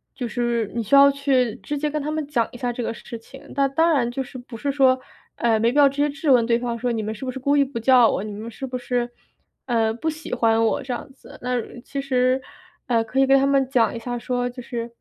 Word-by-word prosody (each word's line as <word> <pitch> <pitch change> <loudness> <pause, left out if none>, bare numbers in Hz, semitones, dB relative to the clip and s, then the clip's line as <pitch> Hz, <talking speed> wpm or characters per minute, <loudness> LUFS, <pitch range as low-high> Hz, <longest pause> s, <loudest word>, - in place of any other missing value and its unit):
就 245 - -3
是 235 -2 -1
你 235 - 0
需 220 +6 +2
要 280 0 +8
去 270 -5 +1
直 295 - -4
接 300 +1 -1
跟 305 0 -2
他 295 - -3
们 310 -1 -2
讲 240 -6 0
一 - - -10
下 245 0 -2
这 245 - -4
个 - - -2
事 230 0 -8
情， 270 +4 -14
那 275 0 +3
当 320 +5 +2
然 245 -6 +2
就 265 +2 -3
是 260 0 -10
不 245 -1 -10
是 280 +4 -1
说， 260 -2 +4 0.4
哎， 225 -2 +2
没 230 +2 +3
必 285 - -2
要 285 -1 +7
直 275 - -4
接 295 - +2
质 285 0 0
问 245 -2 +6
对 235 -1 +3
方 235 -1 -3
说 245 +2 -1
“你 225 -2 -2
们 215 - -3
是 220 - -10
不 260 - -3
是 265 - -8
故 280 +3 +1
意 285 - +5
不 275 -2 -6
叫 240 0 +5
我？ - - -1
你 210 -1 -6
们 220 +3 -7
是 265 +4 -7
不 255 - -6
是， 245 0 -1 0.6
呃， 225 -3 +1
不 315 +8 -2
喜 310 -3 -7
欢 225 -2 +3
我 - - +1
"这 260 - -6
样 245 +2 -5
子。 265 - -15
那 250 -1 0 0.2
其 275 +1 -5
实， 255 -1 +1 0.5
呃， 230 -2 +2
可 225 +4 -2
以 270 - +4
跟 275 0 +6
他 270 - +2
们 275 -1 +2
讲 240 -4 +2
一 230 - -4
下 245 +1 -4
说， 245 +1 -1
就 250 +1 -9
是 235 -1 -5
250 Hz, 300 characters per minute, -23 LUFS, 235-275 Hz, 0.6 s, 要